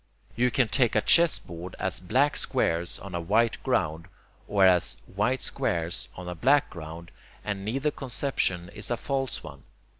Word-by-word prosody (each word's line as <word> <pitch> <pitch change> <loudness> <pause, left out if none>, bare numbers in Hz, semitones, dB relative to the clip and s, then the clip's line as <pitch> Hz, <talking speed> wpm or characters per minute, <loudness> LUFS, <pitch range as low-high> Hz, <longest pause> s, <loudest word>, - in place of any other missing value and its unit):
You 125 +2 +3
can 125 -1 +2
take 115 +2 +2
a 105 - +4
chessboard 90 - +2
as 95 -3 -1
black 130 +11 +2
squares 85 +1 -1
on 100 -2 -9
a 85 - -2
white 110 +7 +2
ground, 80 +3 0 0.4
or 100 -2 +4
as 90 -2 +3
white 125 +7 -1
squares 85 +2 -2
on 90 0 -8
a 90 - -3
black 140 - +3
ground, 85 0 -9 0.3
and 100 -2 -3
neither 135 +8 -1
conception 120 -11 -1
is - - -5
a 120 - 0
false 135 0 -2
one. - - -10
100 Hz, 160 wpm, -27 LUFS, 85-130 Hz, 0.4 s, a